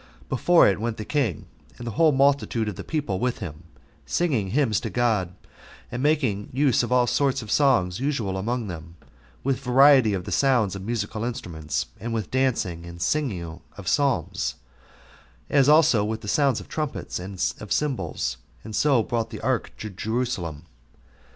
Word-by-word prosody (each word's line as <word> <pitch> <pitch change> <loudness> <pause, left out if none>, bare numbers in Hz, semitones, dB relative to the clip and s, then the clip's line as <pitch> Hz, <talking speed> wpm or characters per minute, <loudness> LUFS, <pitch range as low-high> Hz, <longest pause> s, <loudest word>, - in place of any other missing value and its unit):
Before 170 +6 +5
it 100 +1 +1
went 115 -1 -2
the 110 - -5
king, 130 - -1 0.3
and 120 - -8
the 115 - -3
whole 160 +8 +4
multitude 135 -5 +2
of 105 - -3
the - - -7
people 145 - -2
with 125 +2 0
him, 85 -4 -8 0.4
singing 115 - 0
hymns 120 -3 +2
to - - -4
God, 105 -7 0 0.6
and 120 0 -3
making 130 -9 +1
use 135 -1 +3
of 120 - -3
all 125 -1 +4
sorts 135 0 +1
of 110 - -8
songs 105 -12 +3
usual 125 -9 -1
among 115 +5 -2
them, 85 -3 -8 0.5
with 135 -1 0
variety 130 -4 +5
of 90 - -4
the - - -7
sounds 120 -8 +2
of 95 - -6
musical 110 0 -3
instruments, 80 - -3
and 115 +2 -3
with 110 - -3
dancing 120 -10 0
and 85 0 -10
singing 90 - -2 0.2
of 100 -3 -9
psalms, 95 - 0 1.0
as 140 0 +5
also 150 -8 +5
with 110 +1 -3
the 105 - -9
sounds 140 +1 +2
of - - -11
trumpets 150 - -4
and 90 0 -2
of 105 - -9
cymbals, 130 - -1 0.3
and 110 0 -7
so 135 -6 +3
brought 115 -2 -2
the 110 - -8
ark 130 -3 -1
to 110 - -6
Jerusalem. 100 -6 -3
115 Hz, 170 wpm, -25 LUFS, 95-135 Hz, 1.0 s, Before